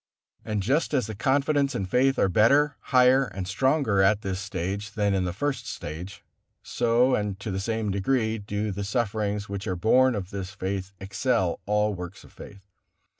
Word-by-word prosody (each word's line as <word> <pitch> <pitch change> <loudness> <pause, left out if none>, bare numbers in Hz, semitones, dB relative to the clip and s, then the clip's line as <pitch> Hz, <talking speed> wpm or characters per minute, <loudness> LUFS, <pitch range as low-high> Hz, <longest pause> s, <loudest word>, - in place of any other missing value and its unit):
And 105 -2 -2
just 145 - +1
as 130 - +1
the 110 - -6
confidence 140 +5 +1
and 95 - -2
faith 130 +6 +2
are - - +3
better, 140 +9 +4
higher 130 +1 +4
and 95 -6 -6
stronger 130 0 +2
at 100 +2 +3
this 95 -1 -3
stage 100 +2 -4
than 105 -2 +1
in 95 -1 0
the 90 - -1
first 120 +3 -3
stage, 90 +5 -7 0.4
so 120 +2 +2
and 105 -3 -1
to 100 +1 -5
the 95 - -2
same 110 0 -2
degree 110 +3 0
do 105 +1 -3
the 100 +1 -4
sufferings 105 -1 -1
which 100 +1 -5
are 95 - -1
borne 125 +7 +3
in 100 -3 -3
this 95 -2 -5
faith 95 -1 -3
excel 100 -1 0
all 105 0 +1
works 90 0 -8
of - - -18
faith. 100 -1 -12
105 Hz, 180 wpm, -26 LUFS, 95-125 Hz, 0.4 s, better